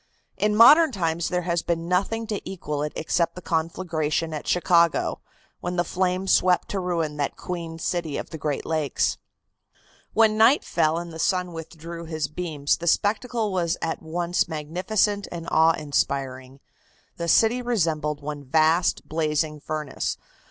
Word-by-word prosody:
In 210 Hz, 0 st, +1 dB
modern 300 Hz, +8 st, +8 dB
times 170 Hz, -5 st, -1 dB
there 180 Hz, 0 st, -1 dB
has 170 Hz, -1 st, 0 dB
been 170 Hz, -1 st, -2 dB
nothing 200 Hz, +5 st, 0 dB
to 210 Hz, -2 st, -3 dB
equal 150 Hz, -6 st, -4 dB
it 150 Hz, 0 st, -2 dB
except 170 Hz, +1 st, 0 dB
the -, -, -7 dB
conflagration 160 Hz, -1 st, -1 dB
at 150 Hz, -, -6 dB
Chicago, 170 Hz, -2 st, +2 dB, 0.4 s
when 175 Hz, 0 st, -4 dB
the 175 Hz, -, +2 dB
flames 185 Hz, +2 st, 0 dB
swept 180 Hz, -1 st, +3 dB
to 200 Hz, -, -2 dB
ruin 165 Hz, -5 st, -2 dB
that 145 Hz, -1 st, -2 dB
queen 170 Hz, -2 st, -5 dB
city 165 Hz, -2 st, -2 dB
of -, -, -6 dB
the 160 Hz, -, -7 dB
Great 145 Hz, -1 st, -2 dB
Lakes. 155 Hz, -4 st, 0 dB, 0.9 s
When 220 Hz, -1 st, +4 dB
night 240 Hz, +6 st, +5 dB
fell 155 Hz, +1 st, +1 dB
and 170 Hz, -1 st, -6 dB
the 160 Hz, -, -8 dB
sun 180 Hz, 0 st, 0 dB
withdrew 165 Hz, +1 st, -8 dB
his 155 Hz, -2 st, -2 dB
beams 155 Hz, -3 st, -1 dB
the 170 Hz, -, -5 dB
spectacle 220 Hz, +3 st, +1 dB
was 175 Hz, -2 st, 0 dB
one 165 Hz, -, -1 dB
at -, -, -6 dB
once 170 Hz, +2 st, -1 dB
magnificent 185 Hz, +7 st, -1 dB
and 170 Hz, -1 st, -6 dB
awe 160 Hz, +1 st, +5 dB
inspiring. 135 Hz, -2 st, -2 dB, 0.6 s
The 170 Hz, -, -3 dB
city 225 Hz, +8 st, +4 dB
resembled 155 Hz, -11 st, -1 dB
one 145 Hz, -1 st, -5 dB
vast 160 Hz, +5 st, +2 dB
blazing 155 Hz, -1 st, -1 dB
furnace. 150 Hz, -1 st, -3 dB
170 Hz, 160 wpm, -24 LUFS, 155-180 Hz, 0.9 s, modern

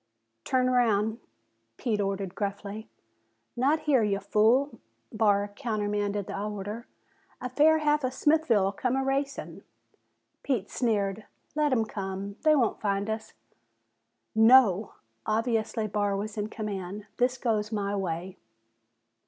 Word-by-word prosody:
"Turn 255 Hz, -1 st, +2 dB
'raound!" 225 Hz, -3 st, +2 dB, 0.6 s
Pete 215 Hz, -5 st, -1 dB
ordered 195 Hz, -2 st, -2 dB
gruffly. 205 Hz, +1 st, -5 dB, 0.7 s
"Not 280 Hz, +6 st, +2 dB
here 275 Hz, -5 st, +3 dB
ya 200 Hz, -2 st, +1 dB
fool!" 225 Hz, +8 st, +2 dB, 0.3 s
Barr 205 Hz, -2 st, +2 dB
countermanded 205 Hz, -3 st, -2 dB
the 195 Hz, -, -5 dB
order. 210 Hz, +2 st, -5 dB, 0.5 s
"A 250 Hz, -, -5 dB
fair 310 Hz, +4 st, +5 dB
half 300 Hz, -1 st, +1 dB
of 255 Hz, -, 0 dB
Smithville'll 265 Hz, -10 st, +2 dB
come 250 Hz, +5 st, -1 dB
a'racin'." 270 Hz, +1 st, -2 dB, 0.8 s
Pete 235 Hz, -8 st, -2 dB
sneered. 210 Hz, -3 st, 0 dB, 0.3 s
"Let 300 Hz, -1 st, +1 dB
'em 225 Hz, -4 st, +2 dB
come. 200 Hz, 0 st, -5 dB
They 310 Hz, 0 st, +5 dB
won't 245 Hz, -6 st, +1 dB
find 200 Hz, +1 st, 0 dB
us." 220 Hz, 0 st, -5 dB, 1.0 s
"No!" 220 Hz, -3 st, +5 dB, 0.3 s
Obviously 225 Hz, 0 st, 0 dB
Barr 205 Hz, -1 st, 0 dB
was 210 Hz, +1 st, -4 dB
in 210 Hz, 0 st, -3 dB
command. 205 Hz, -2 st, -5 dB
"This 250 Hz, +1 st, +1 dB
goes 220 Hz, -4 st, -1 dB
my 205 Hz, -2 st, -1 dB
way." 185 Hz, -1 st, -3 dB
215 Hz, 120 wpm, -28 LUFS, 200-250 Hz, 1.0 s, fair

